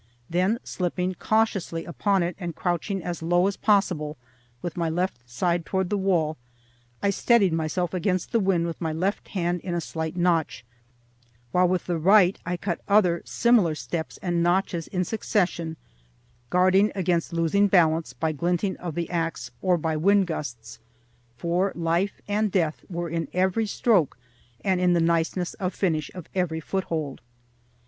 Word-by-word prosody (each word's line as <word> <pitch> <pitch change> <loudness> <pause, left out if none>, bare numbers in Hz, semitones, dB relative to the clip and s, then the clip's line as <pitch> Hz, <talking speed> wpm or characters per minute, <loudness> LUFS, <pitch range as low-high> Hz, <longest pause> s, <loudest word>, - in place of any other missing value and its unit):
Then, 185 +6 +2
slipping 180 0 -2
cautiously 195 -5 0
upon 195 +2 +1
it, 170 0 -2
and 175 -4 -5
crouching 175 +2 -2
as 175 -1 -4
low 175 +2 +3
as 200 0 0
possible, 180 -8 +1 0.5
with 175 - -4
my 170 -2 0
left 175 -4 -1
side 170 +7 0
toward 190 +1 -1
the - - +2
wall, 170 -5 +1 0.7
I 200 - +3
steadied 200 -3 +3
myself 165 +3 -1
against 185 0 -1
the 230 - +3
wind 190 -4 +2
with 170 -1 -5
my 160 -2 -1
left 185 +6 -1
hand 175 -2 -1
in 175 -2 -3
a - - 0
slight 160 0 -4
notch, 170 -7 +1 0.9
while 180 +4 +4
with 185 0 0
the 175 -2 -1
right 195 +2 +5
I 180 0 -1
cut 175 -1 -3
other 185 -5 +4
similar 225 -10 +3
steps 160 +1 -4
and 175 -2 0
notches 175 -1 +1
in 180 -1 -1
succession, 175 -6 -1 0.7
guarding 185 +3 +4
against 175 -3 0
losing 170 +5 +2
balance 165 -6 +3
by 140 +6 -1
glinting 175 +5 -1
of 170 -4 -6
the 170 -1 -2
axe, 165 -1 -2
or 180 -2 +3
by 160 -1 -1
wind 200 +4 +4
gusts, 120 -9 -6 0.6
for 175 +7 0
life 170 +4 0
and 210 0 +1
death 165 -5 0
were 175 -1 -3
in 165 0 -2
every 190 +4 +1
stroke 200 - +2 0.5
and 190 -2 +2
in 180 -1 +4
the 170 - +3
niceness 170 +2 +1
of 185 -2 -2
finish 160 -6 0
of 180 -4 -7
every 175 -4 -1
foothold. 160 -5 -3
175 Hz, 160 wpm, -25 LUFS, 165-190 Hz, 0.9 s, right